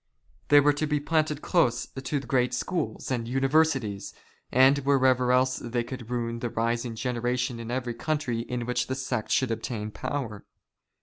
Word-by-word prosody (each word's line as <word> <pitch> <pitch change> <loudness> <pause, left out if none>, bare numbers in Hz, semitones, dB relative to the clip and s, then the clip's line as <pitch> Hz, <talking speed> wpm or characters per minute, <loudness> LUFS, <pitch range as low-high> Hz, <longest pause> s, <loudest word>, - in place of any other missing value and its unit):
They 145 - +7
were 145 +1 +4
to 150 +2 -1
be 150 0 +1
planted 155 0 0
close 120 -9 +2
to 135 +2 -3
great 125 -2 +1
schools 175 -6 -3
and 120 -3 -1
universities, 135 -5 +1 0.4
and 130 +3 +5
wherever 130 -2 +3
else 130 +1 +3
they 120 0 -2
could 120 -1 -8
ruin 115 -1 -2
the 120 - -2
rising 115 +1 -1
generation 125 0 -1
in 115 0 -6
every 125 -1 -2
country 145 -3 -2
in 120 +1 -3
which 125 +1 -1
the 130 - -2
sect 130 -4 -3
should 130 -3 +2
obtain 110 -1 -3
power. 115 -5 -4
125 Hz, 165 wpm, -27 LUFS, 120-140 Hz, 0.4 s, They